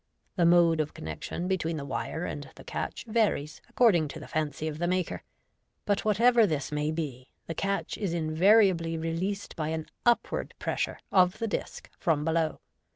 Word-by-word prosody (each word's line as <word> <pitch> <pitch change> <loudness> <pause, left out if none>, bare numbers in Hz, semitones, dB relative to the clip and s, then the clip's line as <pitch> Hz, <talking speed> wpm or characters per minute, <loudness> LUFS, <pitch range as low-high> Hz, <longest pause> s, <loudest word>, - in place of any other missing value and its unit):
The 170 -3 +4
mode 170 -2 +5
of 150 -1 -2
connection 80 - -5
between 165 -4 -1
the 140 - -5
wire - - -3
and - - -5
the - - -12
catch - - -4
varies 210 -10 0
according 185 -11 +4
to 150 +3 -8
the 155 - -10
fancy 155 0 -2
of 155 -1 -4
the 175 - 0
maker 180 0 0
j - - -19 0.6
but, 205 -1 +1
whatever 230 +2 +5
this 150 -5 -2
may 150 0 0
be, 140 -6 -5 0.2
the 165 - -4
catch 195 +3 -2
is 200 -5 -1
invariably 170 +1 +3
released 170 +5 -3
by 155 -3 -2
an 160 0 -2 0.2
upward 240 -1 +1
pressure - - -2
of 180 -1 +4
the 230 - -2
disc 205 - -4
from 150 -3 +1
below. 160 -1 0
165 Hz, 175 wpm, -28 LUFS, 155-195 Hz, 0.6 s, mode